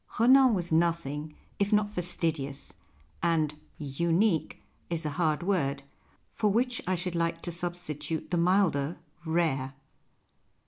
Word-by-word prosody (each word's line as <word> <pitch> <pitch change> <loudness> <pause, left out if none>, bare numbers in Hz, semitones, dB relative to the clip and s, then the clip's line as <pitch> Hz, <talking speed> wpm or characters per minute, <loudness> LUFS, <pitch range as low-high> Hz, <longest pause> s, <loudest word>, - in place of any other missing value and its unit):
Rcnan 255 +1 +6
was 175 -2 -3
nothing 160 -2 0 0.2
if 200 +1 +1
not 210 -1 +4
fastidious, 165 -7 -3 0.5
and 160 -3 +2 0.2
" - - -35 0.2
unique 170 +1 +2 0.2
" - - -38
is 165 -1 -1
a 150 - -1
hard 160 0 0
word, 140 -8 0 0.4
for 215 -2 0
which 245 +3 +1
I 185 - +2
should 180 0 -3
like 165 0 -1
to 175 - -3
substitute 165 -3 -4
the 175 - +2
milder 170 -4 +2 0.2
" 170 +1 -28
rare." 145 -5 0
170 Hz, 140 wpm, -29 LUFS, 155-185 Hz, 0.5 s, Rcnan